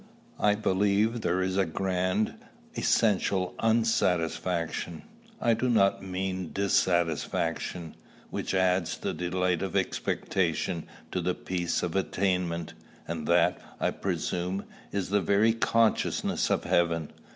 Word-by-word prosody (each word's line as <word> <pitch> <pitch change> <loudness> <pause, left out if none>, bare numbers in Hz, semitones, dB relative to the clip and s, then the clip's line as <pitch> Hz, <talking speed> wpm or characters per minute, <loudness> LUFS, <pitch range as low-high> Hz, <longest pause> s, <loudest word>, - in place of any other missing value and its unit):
I 105 0 +4
believe 105 +3 +1
there 90 0 +1
is 95 0 -1
a 95 - +3
grand, 95 +4 0 0.4
essential 95 -3 +2
unsatisfaction, 90 -7 0 0.4
I 115 - +3
do 120 +3 0
not 100 -5 +3
mean 95 -2 -3
dissatisfaction, 85 -3 0 0.4
which - - -2
adds 95 -2 +2
the - - -3
delight 90 -1 0
of 95 -3 -3
expectation 85 -2 -1 0.2
to 90 - -1
the 90 +1 0
peace 90 -2 -2
of 90 0 -2
attainment; 90 -3 0 0.3
and 80 -2 -4
that, 85 +1 +3 0.2
I - - +1
presume, 90 +2 -2 0.3
is 100 -2 -2
the 100 +1 +2
very 100 +5 +3
consciousness 115 -1 +1
of - - +1
heaven. 85 -3 +1
95 Hz, 120 wpm, -28 LUFS, 85-100 Hz, 0.4 s, I